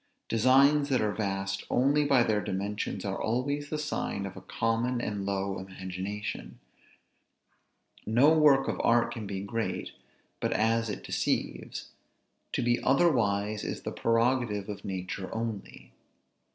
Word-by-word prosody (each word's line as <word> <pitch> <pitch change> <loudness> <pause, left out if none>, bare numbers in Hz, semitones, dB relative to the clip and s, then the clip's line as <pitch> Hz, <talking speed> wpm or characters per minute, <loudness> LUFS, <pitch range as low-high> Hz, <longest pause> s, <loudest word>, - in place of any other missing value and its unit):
Designs 140 +5 +4
that 130 -2 +3
are 105 -1 0
vast 95 -2 -2
only 140 +4 +3
by 135 -4 +5
their 105 -2 +1
dimensions 100 +1 -3
are 95 0 -2
always 140 +6 -1
the 155 - -2
sign 150 -9 -2
of 95 - -7
a 95 - -9
common 115 +5 0
and 105 -4 -3
low 100 0 -1
imagination. 95 +2 -6 1.5
No 125 +8 +5
work 145 -3 +5
of - - -1
art 120 0 +3
can 110 -3 -6
be 95 -1 -4
great, 115 +3 -3 0.5
but - - 0
as 115 +1 +1
it 105 - -5
deceives; - - -2 0.6
to - - -1
be 120 0 +2
otherwise 110 -8 +2
is - - -4
the - - -3
prerogative 115 -3 +1
of 105 - -6
nature 95 0 -4
only. 110 -3 -5
110 Hz, 140 wpm, -29 LUFS, 100-125 Hz, 1.5 s, by